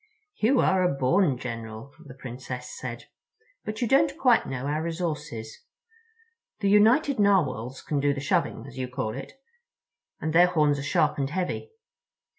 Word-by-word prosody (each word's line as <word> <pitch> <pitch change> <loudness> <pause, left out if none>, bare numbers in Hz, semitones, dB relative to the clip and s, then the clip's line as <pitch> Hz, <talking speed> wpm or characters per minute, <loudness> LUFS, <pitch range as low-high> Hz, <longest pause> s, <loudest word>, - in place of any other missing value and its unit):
"You 250 +4 +3
are 190 -1 +3
a 180 -5 +2
born 140 +2 +2
general," 115 +1 -7
the 135 -4 -12
Princess 125 -1 -7
said; - - -7 0.6
"but 215 +3 -4
you - - +1
don't 280 +3 +3
quite 250 -8 +3
know 130 0 -4
our 150 +2 -1
resources. 150 -9 -4 1.0
The 200 -2 +1
United 240 +6 +4
Narwhals 135 - +1
can 145 - -1
do 145 +1 +2
the 140 - -3
shoving, 135 -4 -1
as 135 - -10
you 130 - -2
call 125 -4 -3
it—and 465 - -10
their 175 +2 +7
horns 150 -5 +2
are - - -3
sharp 145 +1 +1
and 135 -1 0
heavy. 185 - -3
150 Hz, 155 wpm, -26 LUFS, 130-205 Hz, 1.0 s, their